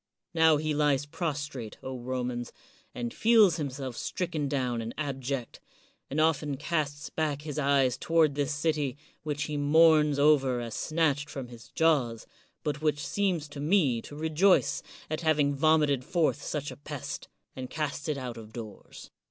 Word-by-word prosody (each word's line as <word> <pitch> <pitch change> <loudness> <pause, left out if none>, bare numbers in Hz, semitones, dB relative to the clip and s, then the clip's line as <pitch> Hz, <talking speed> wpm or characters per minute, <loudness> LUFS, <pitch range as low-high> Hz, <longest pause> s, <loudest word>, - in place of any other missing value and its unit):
Now 160 -2 +5
he 155 +1 -1
lies 145 -2 +2
prostrate, 145 - -4
O 130 0 -5
Romans, 125 -1 -3 0.4
and 120 -1 -4
feels 215 -7 +5
himself 135 -4 -4
stricken 165 +1 -2
down 125 -4 -1
and 115 +1 -6
ab 140 -3 -3
ject, 130 -2 -4 0.5
and 145 - -2
often 150 -3 +1
casts 150 -1 -2
back 150 -2 -1
his 150 -1 -4
eyes 135 -3 +2
toward 165 -3 +3
this 145 0 -1
city, 145 -3 -1 0.2
which 150 -1 -2
he 150 -1 -3
mourns 150 0 +5
over 140 -4 +4
as 115 -2 -5
snatched 150 -3 0
from 130 -4 -6
his 115 -2 -12
jaws, 135 -9 +1 0.4
but 150 -1 -2
which 150 -2 0
seems 185 -7 0
to 145 - -9
me 145 - +2
to 145 - -10
rejoice 160 +5 +3 0.3
at 155 +1 -3
having 150 -3 +2
vomited 150 -2 +3
forth 160 0 +1
such 145 0 -3
a - - -10
pest, 145 -2 -6 0.3
and 130 -1 -6
cast 155 +1 -3
it 150 - 0
out 125 -3 -5
of 110 -1 -10
doors. 110 -2 -10
145 Hz, 160 wpm, -29 LUFS, 130-155 Hz, 0.5 s, Now